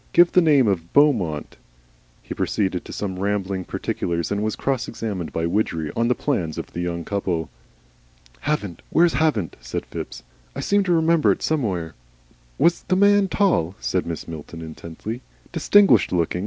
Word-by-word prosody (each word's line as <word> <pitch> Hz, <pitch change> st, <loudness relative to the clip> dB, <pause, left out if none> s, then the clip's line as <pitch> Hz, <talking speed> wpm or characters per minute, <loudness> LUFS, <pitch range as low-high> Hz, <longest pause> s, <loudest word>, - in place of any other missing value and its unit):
Give 175 Hz, 0 st, +6 dB
the 180 Hz, -, +5 dB
name 145 Hz, -7 st, +4 dB
of 85 Hz, -4 st, -1 dB
Beaumont." 110 Hz, -, +2 dB, 0.7 s
He -, -, -6 dB
proceeded 95 Hz, -4 st, -1 dB
to -, -, -9 dB
some 95 Hz, -3 st, -4 dB
rambling 95 Hz, -2 st, -1 dB
particulars, 85 Hz, -1 st, -2 dB
and 100 Hz, 0 st, 0 dB
was 110 Hz, 0 st, -1 dB
cross 135 Hz, -3 st, -1 dB
examined 100 Hz, -7 st, -4 dB
by 80 Hz, -, -1 dB
Widgery 85 Hz, -4 st, -1 dB
on 115 Hz, 0 st, +1 dB
the 125 Hz, -, +2 dB
plans 90 Hz, -, -2 dB
of -, -, -6 dB
the 85 Hz, -, -3 dB
young 85 Hz, -1 st, -3 dB
couple. 90 Hz, -5 st, -2 dB, 0.9 s
"Havant! 105 Hz, -, -2 dB
Where's 170 Hz, 0 st, +4 dB
Havant?" 130 Hz, -, 0 dB
said -, -, -4 dB
Phipps. -, -, -7 dB, 0.3 s
"I -, -, -5 dB
seem 205 Hz, 0 st, +2 dB
to 180 Hz, -, 0 dB
remember 165 Hz, -1 st, +4 dB
it -, -, -2 dB
somewhere." 95 Hz, -, -1 dB, 0.6 s
"Was 170 Hz, -, +3 dB
the 185 Hz, -, 0 dB
man 200 Hz, +1 st, +5 dB
tall?" 175 Hz, -, +1 dB
said 90 Hz, -, -1 dB
Mrs. 85 Hz, -1 st, -5 dB
Milton, 80 Hz, +1 st, -8 dB
intently, 85 Hz, +9 st, -7 dB, 0.3 s
"distinguished 195 Hz, -, +5 dB
looking? 85 Hz, 0 st, 0 dB
100 Hz, 165 wpm, -23 LUFS, -, 0.9 s, Give